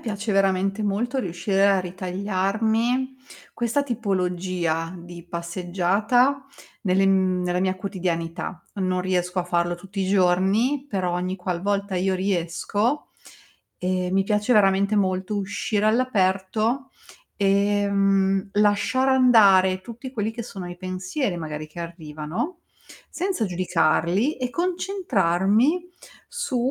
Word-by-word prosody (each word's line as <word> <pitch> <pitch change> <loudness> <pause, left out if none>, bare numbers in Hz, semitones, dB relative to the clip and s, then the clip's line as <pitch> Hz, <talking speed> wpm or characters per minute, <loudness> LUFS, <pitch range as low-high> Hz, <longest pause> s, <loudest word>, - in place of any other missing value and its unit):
piace 210 -1 -3
veramente 195 +1 +1
molto 230 +6 -1
riuscire 195 -1 +1
a 195 -1 +4
ritagliarmi 205 +7 -1 0.4
questa 240 +4 0
tipologia 180 - -1
di 170 0 -11
passeggiata 190 +10 0 0.4
nelle 195 -1 +2
mhmm, 190 -1 +2
nella 180 0 0
mia 185 0 +1
quotidianità. 180 -2 -4
Non 185 -2 0
riesco 180 0 -1
a 180 - 0
farlo 175 0 0
tutti 195 +3 -7
i 190 - -1
giorni, 200 +9 +2
però 185 -3 -1
ogni 180 +1 -2
qualvolta 195 +2 -2
io 190 +1 +1
riesco, 195 - -1 0.7
ehm, 180 0 -1
mi 195 0 +3
piace 210 +3 +1
veramente 200 -1 +3
molto 190 +1 0
uscire 205 +1 -1
all'aperto 220 +2 +1 0.5
e, 200 0 +2
mhmm, 195 -1 +2
lasciar 210 +6 +2
andare 200 -8 +5
tutti 235 +6 -9
quelli 220 -3 -1
che 235 +1 -5
sono 195 -6 -7
i 175 - -8
pensieri 185 +4 -3
magari 155 -2 -5
che 155 +3 -10
arrivano, 170 - -5 0.5
senza 365 - -1
giudicarli, 180 - +1
e 250 -1 -3
concentrarmi 315 - +1 0.4
su 480 - -3
195 Hz, 115 wpm, -24 LUFS, 180-220 Hz, 0.7 s, andare